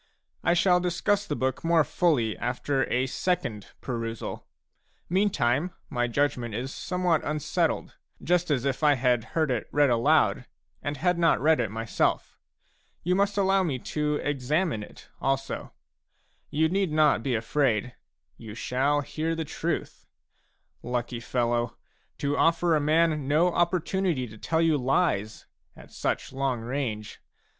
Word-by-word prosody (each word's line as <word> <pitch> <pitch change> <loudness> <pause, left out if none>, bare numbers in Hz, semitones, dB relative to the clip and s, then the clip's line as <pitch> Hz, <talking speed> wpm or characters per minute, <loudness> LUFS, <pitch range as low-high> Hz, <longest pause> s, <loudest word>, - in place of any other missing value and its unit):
I 175 - +3
shall 180 0 +4
discuss 200 +4 0
the 150 - -2
book 130 -1 -2
more 165 -1 +4
fully 145 -7 +1
after 135 +3 -1
a 125 +1 +2
second 120 - -2
perusal; 115 -2 -5 0.6
meantime, 175 - +1 0.2
my 120 -3 0
judgment 120 -3 -1
is 130 +4 -4
somewhat 180 -4 0
unsettled, 150 -1 -1 0.2
just 175 0 +1
as 140 -3 +1
if 135 +1 -1
I 150 -2 +5
had 125 -2 +2
heard 155 -4 +2
it 120 -3 -2
read 145 -3 +3
aloud, 125 +1 +3 0.3
and 145 0 -3
had 180 +4 +1
not 165 -1 +4
read 155 0 +3
it 115 -4 0
myself. 110 +2 -1 0.7
You 180 - +1
must 200 +2 +1
allow 195 -1 +3
me 155 -8 -1
to 150 +4 -2
examine 145 - -1
it 105 - -12
also. 135 0 -2 0.8
You 160 +2 +2
need 190 0 0
not 150 -5 +3
be 125 0 -1
afraid; 120 0 0 0.4
you 110 -2 -9
shall 135 +5 +1
hear 160 +3 -2
the 160 -1 -3
truth. - - -4 0.7
Lucky 120 0 -3
fellow, 120 0 -1 0.4
to 145 0 -1
offer 165 +1 +3
a - - +3
man 155 -1 +2
no 165 +5 +3
opportunity 175 -4 0
to 110 - -12
tell 160 +7 0
you 160 -3 +3
lies 125 - 0 0.3
at - - -15
such - - -2
long 135 -3 -1
range! 115 -4 -4
145 Hz, 145 wpm, -27 LUFS, 125-165 Hz, 0.8 s, I